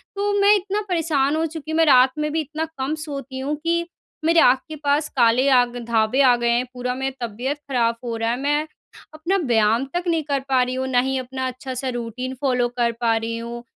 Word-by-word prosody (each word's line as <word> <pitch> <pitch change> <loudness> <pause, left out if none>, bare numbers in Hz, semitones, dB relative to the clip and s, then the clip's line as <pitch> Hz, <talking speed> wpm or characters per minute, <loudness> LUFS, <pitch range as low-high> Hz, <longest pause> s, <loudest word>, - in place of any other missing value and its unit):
तो 405 +1 0
मैं 405 +1 +6
इतना 405 +1 -1
परेशान 310 -5 +1
हो 320 +1 0
चुकी 315 -1 -6
हूँ, 315 - -1
मैं 325 - +5
रात 260 -3 +6
में 300 0 -1
भी 320 +1 0
इतना 310 +2 -4
कम 270 +3 -2
सोती 275 -3 -6
हूँ, 285 +3 -2
कि 340 0 0 0.4
मेरे 330 0 +4
आँख 255 +1 +5
के 310 - -6
पास 290 +1 +1
काले 240 +2 +4
आग 245 -2 +3
धब्बे 225 +3 +2
आ 255 -3 +6
गए - - +3
हैं। 240 +1 +1
पूरा 250 0 -3
मेरा 265 -1 -3
तबियत 250 +7 -4
खराब 235 -3 +1
हो 235 -1 -3
रहा 225 0 -1
है। 240 - -1
मैं 295 +2 0 0.5
अपना 335 +5 -1
व्यायाम 225 +1 +2
तक 350 0 -1
नहीं 330 -2 +1
कर 280 -1 -1
पा 260 -1 +3
रही 250 +1 -3
हूँ, 260 0 -2
ना 250 -2 +2
ही 265 +1 0
अपना 260 0 -4
अच्छा-सा 255 +1 -5
रूटीन 245 +3 -5
फ़ॉलो 250 -3 +1
कर 235 -1 +2
पा 230 -1 +3
रही 225 +1 -3
हूँ, 235 +1 -7
265 Hz, 225 wpm, -22 LUFS, 245-305 Hz, 0.5 s, मैं